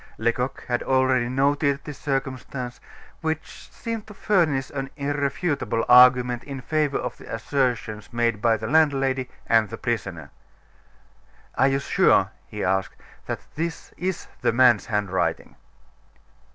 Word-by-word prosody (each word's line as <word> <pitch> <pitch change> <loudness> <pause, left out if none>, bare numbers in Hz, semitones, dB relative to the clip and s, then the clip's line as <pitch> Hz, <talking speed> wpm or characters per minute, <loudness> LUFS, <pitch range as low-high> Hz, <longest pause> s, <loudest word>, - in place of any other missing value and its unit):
Lecoq 120 +3 -1
had 120 -1 0
already 130 -2 +2
noted 140 +2 +1
this 150 - -8
circumstance, 130 -2 -4 0.4
which 160 0 -4
seemed 230 -2 -5
to 210 - -11
furnish 160 -10 +1
an 135 -1 -4
irrefutable 145 - -1
argument 125 -1 +6
in 140 -2 -6
favor 150 +1 0
of 125 - -4
the - - -11
assertions 115 -3 -2
made 115 -3 0
by 115 -1 +3
the - - -6
landlady 135 -4 +2 0.2
and 110 -2 +3
the 115 - -6
prisoner. 95 -11 -3 1.2
"Are 135 - +3
you 135 0 +2
sure," 140 - +3 0.2
he - - -5
asked, 95 +1 0 0.3
"that - - -3
this 165 +1 -4
is 185 0 -3
the - - +2
man's 120 -3 +4
handwriting?" 105 -4 -1
130 Hz, 130 wpm, -24 LUFS, 120-145 Hz, 1.2 s, argument